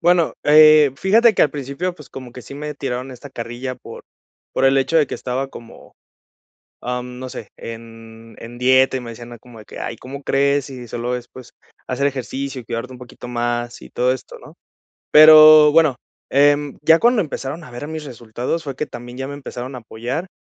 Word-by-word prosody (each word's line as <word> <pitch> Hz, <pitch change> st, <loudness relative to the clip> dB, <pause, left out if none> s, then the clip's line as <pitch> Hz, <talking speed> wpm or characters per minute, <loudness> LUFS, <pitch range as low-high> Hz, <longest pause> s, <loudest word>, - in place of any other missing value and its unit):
Bueno, 175 Hz, -1 st, +2 dB
eh, 155 Hz, -1 st, +7 dB
fíjate 225 Hz, +7 st, +4 dB
que -, -, +3 dB
al 145 Hz, -, +3 dB
principio, 145 Hz, +6 st, -4 dB
pues, 150 Hz, -5 st, -15 dB
como 130 Hz, -2 st, -10 dB
que 125 Hz, -, -10 dB
sí 140 Hz, -, -11 dB
me 150 Hz, +1 st, -6 dB
tiraron 130 Hz, -1 st, -5 dB
esta 130 Hz, +3 st, -11 dB
carrilla 120 Hz, +2 st, -6 dB
por -, -, -12 dB, 0.5 s
por -, -, 0 dB
el 135 Hz, +1 st, +3 dB
hecho 150 Hz, +5 st, +2 dB
de 150 Hz, -, +3 dB
que -, -, -5 dB
estaba 130 Hz, +2 st, -4 dB
como, 115 Hz, -3 st, -14 dB, 0.9 s
am, 125 Hz, 0 st, -5 dB
no 130 Hz, 0 st, -7 dB
sé, 110 Hz, -, -8 dB
en 115 Hz, -1 st, -11 dB
en 120 Hz, +1 st, -10 dB
dieta 130 Hz, +1 st, +3 dB
y -, -, -4 dB
me 115 Hz, -1 st, -8 dB
decían, 120 Hz, +1 st, -11 dB
ah, 120 Hz, -, -11 dB
como 120 Hz, -1 st, -15 dB
de -, -, -12 dB
que: -, -, -11 dB
"Ay, -, -, -5 dB
¿cómo 140 Hz, +4 st, -10 dB
crees?, 140 Hz, 0 st, +1 dB
si 125 Hz, -3 st, -9 dB
solo 120 Hz, +2 st, -3 dB
es, 125 Hz, -1 st, -8 dB
pues, 125 Hz, -1 st, -14 dB, 0.3 s
hacer 135 Hz, +2 st, -1 dB
ejercicio 135 Hz, 0 st, -5 dB
y -, -, -20 dB
cuidarte 115 Hz, +3 st, -5 dB
un 125 Hz, -, -12 dB
poquito 125 Hz, 0 st, -11 dB
más, 120 Hz, 0 st, -3 dB
y -, -, -12 dB
todo 125 Hz, +1 st, 0 dB
esto", 130 Hz, -, -10 dB
¿no? -, -, -15 dB, 0.6 s
Pero 155 Hz, 0 st, +9 dB
bueno, 155 Hz, -4 st, +4 dB, 0.3 s
em, 145 Hz, +1 st, +2 dB
ya 160 Hz, +2 st, +5 dB
cuando 240 Hz, -1 st, +3 dB
empezaron 150 Hz, 0 st, -5 dB
a 125 Hz, -, -13 dB
ver 120 Hz, +5 st, -7 dB
mis 160 Hz, -1 st, -6 dB
resultados 125 Hz, +5 st, -5 dB
fue 140 Hz, -3 st, -6 dB
que 150 Hz, -, -3 dB
también 120 Hz, +1 st, -10 dB
ya 135 Hz, 0 st, -4 dB
me 140 Hz, -, -7 dB
empezaron 130 Hz, -2 st, -8 dB
a -, -, -6 dB
apoyar, 120 Hz, +9 st, -5 dB
130 Hz, 210 wpm, -19 LUFS, 120-145 Hz, 0.9 s, Pero